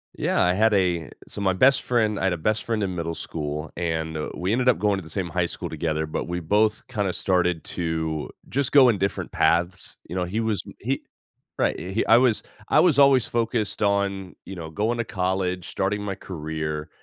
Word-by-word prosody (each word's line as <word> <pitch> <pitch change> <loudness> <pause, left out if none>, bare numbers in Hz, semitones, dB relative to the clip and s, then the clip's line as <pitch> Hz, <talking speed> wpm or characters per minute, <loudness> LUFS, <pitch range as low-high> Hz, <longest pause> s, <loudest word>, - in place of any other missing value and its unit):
Yeah, - - +1
I 90 - +4
had 110 +3 +3
a 90 -5 +1 0.2
so - - -5
my 95 -1 +2
best 130 +9 +4
friend 110 -4 +1
I - - -3
had 95 - +2
a - - -2
best 110 +7 0
friend 115 -2 -1
in 95 -3 -2
middle 85 -1 -3
school, 75 -1 -5
and 80 -2 -2 0.2
we 90 +3 -2
ended 125 +3 +1
up 125 - +3
going 105 -2 +2
to 95 - -6
the 80 - -11
same 90 +1 -2
high 90 -1 0
school 85 0 -5
together, 80 0 -2
but 75 - -3
we 90 0 -2
both 105 +6 +1
kinda 105 -7 -1
started 90 -3 +1
to 80 -3 -2 0.2
just 140 +1 0
go 135 -3 +7
in 110 - +2
different 100 +1 -2
paths. 90 +3 +1
You 85 - -5
know, 90 - 0
he 90 +5 -2
was 110 -4 0 0.2
he 135 +5 -2 0.5
right, - - +1
he 95 +5 -2
I 115 - +6
was 125 -3 +3 0.3
I - - +5
was 155 -3 +4
always 140 -3 +6
focused 115 -2 -1
on, 100 -2 0
you 95 - -7
know, 80 -3 -7
going 110 +8 -1
to - - +1
college, 90 -2 -2
starting 100 +2 -1
my 100 -1 -3
career, 75 -3 -5
95 Hz, 210 wpm, -24 LUFS, 85-110 Hz, 0.5 s, go